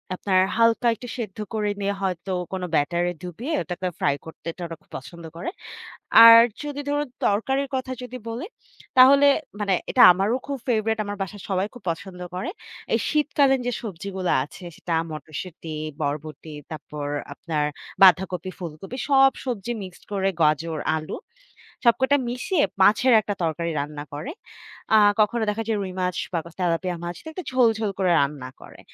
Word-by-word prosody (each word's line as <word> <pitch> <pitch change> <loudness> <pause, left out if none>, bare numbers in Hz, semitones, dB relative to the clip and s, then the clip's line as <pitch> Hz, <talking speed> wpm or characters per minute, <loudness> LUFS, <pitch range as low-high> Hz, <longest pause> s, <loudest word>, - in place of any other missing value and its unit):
আপনার 185 0 +2 0.2
হালকা 230 +1 +3
একটু 245 - -10
সেদ্ধ 215 -5 -5 0.2
করে 210 -1 0
নিয়ে 200 0 0
হয়তো 190 0 -2 0.2
কোন 185 - -3
ব্যাটারে 175 +4 +1
ডুবিয়ে 200 - -5
ওটাকে 180 +3 -4
ফ্রাই 140 - +2
করতে 160 0 -11 0.2
ওরা 165 -1 -6
খুব - - -32
পছন্দ 170 +6 -11
করে। 175 - -3 0.7
আর 230 0 +11 0.3
যদি 290 -1 -4
ধরুন 290 0 0 0.2
তরকারির 265 +7 +1
কথা 260 0 -3
যদি 250 0 -7
বলি 235 +8 -4 0.5
তাহলে 275 +3 +8 0.3
মানে 200 -2 +1 0.2
এটা - - +4
আমারও 200 +7 +1
খুব 280 -1 -3
ফেভারাইট। 220 -2 +1
আমার 205 0 -5
বাসার 195 +1 -5
সবাই 190 +1 0
খুব 245 - -13
পছন্দ 180 +2 -8 0.2
করে। 185 - -3 0.4
এই - - +3
শীতকালীন 285 -3 +3
যে - - +1
সবজিগুলো 190 -2 -3
আছে 165 +5 -12
সেটা 170 - -4 0.2
মটরশুঁটি, 155 +1 -7 0.3
বরবটি, 150 +1 -4 0.2
তারপর 150 -2 -6 0.3
আপনার 150 -1 -2 0.4
বাঁধাকপি 185 -1 +4
ফুলকপি 175 +7 -7
সব 270 -1 +6
সবজি 240 -3 -3
মিক্সড 185 -1 -11
করে 195 -1 +1
গাজর, 155 +1 +2 0.2
আলু। 155 0 -4 0.7
সবকটা 265 +4 +4
মিশিয়ে 290 +7 0 0.2
মাছের 220 +6 +5
একটা 205 -1 -3
তরকারি 170 +1 -1
রান্না 145 0 -5
করে। 150 - -5 0.7
আ - - +8 0.2
কখনো 220 +2 +2
দেখা 225 +2 -2
যায় 225 -1 0
রুই 185 -1 -5
মাছ 180 -1 -1 0.2
বা 175 - +1 0.2
তেলাপিয়া 175 0 0
মাছটা 175 - -7
একটু 365 +3 -6
ঝোলঝোল 225 -4 +2
করে 185 -2 +2
রান্না 140 -2 -2
করে। - - -14
195 Hz, 155 wpm, -24 LUFS, 170-240 Hz, 0.7 s, আর